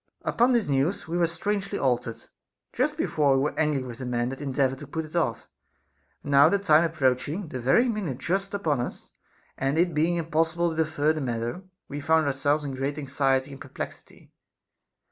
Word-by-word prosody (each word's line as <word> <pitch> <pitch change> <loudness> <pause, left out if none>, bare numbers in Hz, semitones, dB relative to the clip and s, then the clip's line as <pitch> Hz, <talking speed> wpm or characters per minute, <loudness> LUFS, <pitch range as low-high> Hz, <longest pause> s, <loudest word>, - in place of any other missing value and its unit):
19. - - -1
Upon 240 +2 +4
this 235 -5 +2
news 140 +8 0
we 165 - -3
were 175 -1 +3
strangely 200 +4 -2
altered. 120 -3 -1 0.5
Just - - 0
before 145 -3 +2
we 135 - +1
were 150 - -1
angry 150 -4 +1
with 120 -2 -8
the 130 - -5
man 120 0 0
that 135 +2 -7
endeavored 135 -1 0
to 145 - -9
put 160 +3 -4
it 155 - -12
off; 170 - -1 0.8
and 145 - -5
now 140 +2 +7
the 200 - +2
time 160 -5 +4
approaching, 155 +2 0
the 130 - -5
very 135 - +3
minute 205 - -2
just 195 +7 -2
upon 155 -9 0
us, 120 - -6 0.5
and 135 +3 0
it 175 0 +2
being 160 +3 +2
impossible 165 +1 0
to - - -5
defer 155 -1 +1
the 155 - -4
matter, 120 +4 -3 0.3
we 145 - -5
found 160 +2 +3
ourselves 145 +2 +1
in 140 -2 -4
great 135 +2 -3
anxiety 135 -1 0
and 135 - -11
perplexity. - - -9
150 Hz, 195 wpm, -26 LUFS, 135-170 Hz, 0.8 s, now